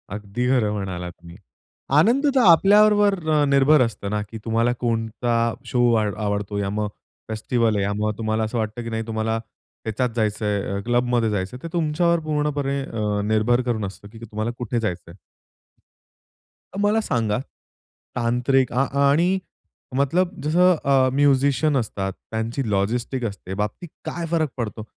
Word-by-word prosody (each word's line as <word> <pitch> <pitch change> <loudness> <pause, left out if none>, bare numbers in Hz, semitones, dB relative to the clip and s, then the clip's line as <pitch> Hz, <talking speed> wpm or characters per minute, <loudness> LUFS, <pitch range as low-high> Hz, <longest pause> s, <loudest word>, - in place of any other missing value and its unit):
अगदी 105 +4 -3
खरं 115 -6 +2
म्हणालात 90 -3 -4
तुम्ही. 85 +1 -14 0.6
आनंद 240 - +4
तर - - +5
आपल्याबरोबर 205 +3 +5 0.3
निर्भर 140 +1 +5
असतं 110 -4 -1
ना 105 0 -1
की 110 - -7
तुम्हाला 115 +2 +2
कोणता 115 +1 -1 0.3
शो 125 - 0
आवडतो, 105 -1 -1
या 100 -1 -1
मग 105 +1 -1 0.4
फेस्टिव्हल 110 0 0
आहे, 100 - +1
या 100 +1 -1
मग 105 0 +1
तुम्हाला 110 0 -1
असं 110 +2 -2
वाटतं 110 +2 -3
की 115 - -5
नाही 110 0 -2
तुम्हाला 110 0 -1 0.4
त्याच्यात 115 +3 -1
जायचंय, 105 -2 0
अ, - - -2
क्लब 120 0 +2
मध्ये 115 -2 +2
जायचंय 105 +4 -3
ते 165 - -4
तुमच्यावर 170 +1 +1
पूर्णपणे 145 -2 -1
अ, 105 -4 -2
निर्भर 110 +3 +2
करून 110 -3 -1
असतं 100 +1 -9
की 115 - -12
तुम्हाला 110 0 -4
कुठे 120 0 -2
जायचंय? 90 -6 -4 1.6
मला 205 +2 +2
सांगा 115 - 0 0.8
तांत्रिक 125 +2 +1
अ, 135 +2 +2 0.2
आणि 175 +6 +3 0.6
मतलब 175 +7 +1
जसं 180 +4 +4
अ, 135 -1 +4
म्युझिशियन 140 +1 +3
असतात, 100 -5 -2 0.2
त्यांची 115 +2 -2
लॉजिस्टिक 120 +6 -1
असते 100 -3 -6
बाबतीत 105 - -4 0.2
काय 170 0 -4
फरक 160 -3 +1
पडतो? 110 -2 -4
115 Hz, 145 wpm, -23 LUFS, 105-140 Hz, 1.6 s, तर